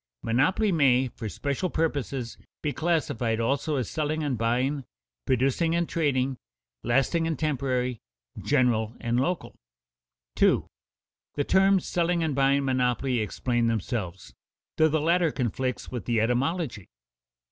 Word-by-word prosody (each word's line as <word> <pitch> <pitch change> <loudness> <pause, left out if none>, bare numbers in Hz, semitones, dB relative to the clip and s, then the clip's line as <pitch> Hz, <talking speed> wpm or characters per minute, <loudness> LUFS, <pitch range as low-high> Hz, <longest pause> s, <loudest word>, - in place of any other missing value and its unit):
_Monopolies 180 - +2
may, 130 -5 +3
for 115 -2 -6
special 140 - -2
purposes, 140 -7 -2 0.3
be 150 -2 -1
classified 140 -9 0
also 140 +6 0
as 125 -6 -1
selling 155 0 -2
and 140 -3 0
buying, 125 +5 0 0.4
producing 135 +6 +2
and 170 0 +1
trading, 135 -5 0 0.5
lasting 135 +7 +1
and 160 -3 -1
temporary, 130 -5 -1 0.4
general 115 -3 +1
and 120 +1 0
local._ - - -2 0.7
The 145 - +1
terms 190 +3 +3
selling 170 -1 0
and 155 -2 0
buying 135 +1 +2
monopoly 125 -1 +1
explain 120 +2 0
themselves, 95 - -3 0.4
though 160 0 +5
the 155 +1 +1
latter 170 +1 +2
conflicts 130 0 -3
with 125 -2 -5
the 120 -2 +1
etymology. 125 - -1
130 Hz, 125 wpm, -27 LUFS, 120-155 Hz, 0.7 s, though